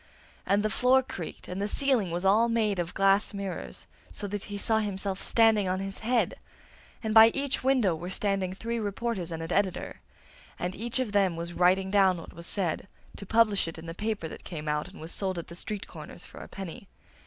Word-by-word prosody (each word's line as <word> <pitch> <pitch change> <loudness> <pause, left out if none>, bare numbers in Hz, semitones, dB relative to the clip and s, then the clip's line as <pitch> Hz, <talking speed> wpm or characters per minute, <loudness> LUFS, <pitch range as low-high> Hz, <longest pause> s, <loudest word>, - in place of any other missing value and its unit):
And 200 +2 +3
the 215 - +1
floor 255 +3 +4
creaked, 175 -9 -7
and 180 +2 -4
the 205 - 0
ceiling 250 -5 +2
was 175 +3 -2
all 220 +5 +5
made 215 -4 +1
of 175 0 -3
glass 195 +2 +3
mirrors, 190 - -5 0.3
so - - -5
that 205 0 -4
he 205 - -5
saw 220 +2 +2
himself 195 -2 -2
standing 225 -4 +4
on 185 +1 0
his 195 0 -5
head, 235 +2 +1 0.7
and 220 -1 -1
by 220 0 +10
each 275 -2 0
window 255 -9 +3
were 170 +3 -5
standing 195 -1 0
three 230 +5 -3
reporters 205 -3 -2
and 165 -1 -4
an 165 - -3
editor; 195 -2 -1 0.6
and 180 +1 -2
each 235 +5 -2
of 255 -5 -1
them 195 -4 +3
was 170 +1 -5
writing 185 +2 +3
down 190 -3 +4
what 165 - -10
was 170 0 -8
said, 190 -2 -1 0.3
to 200 - -8
publish 220 -4 +3
it 165 - -6
in 160 - -9
the 165 - -5
paper 210 -2 -2
that - - -10
came 155 -3 -6
out 150 0 0
and - - -13
was 160 +2 -7
sold 190 -2 -2
at 170 - -6
the 170 - -9
street 205 +2 -4
corners - - -9
for - - -12
a - - -9
penny. 195 0 -8
195 Hz, 215 wpm, -28 LUFS, 180-220 Hz, 0.7 s, by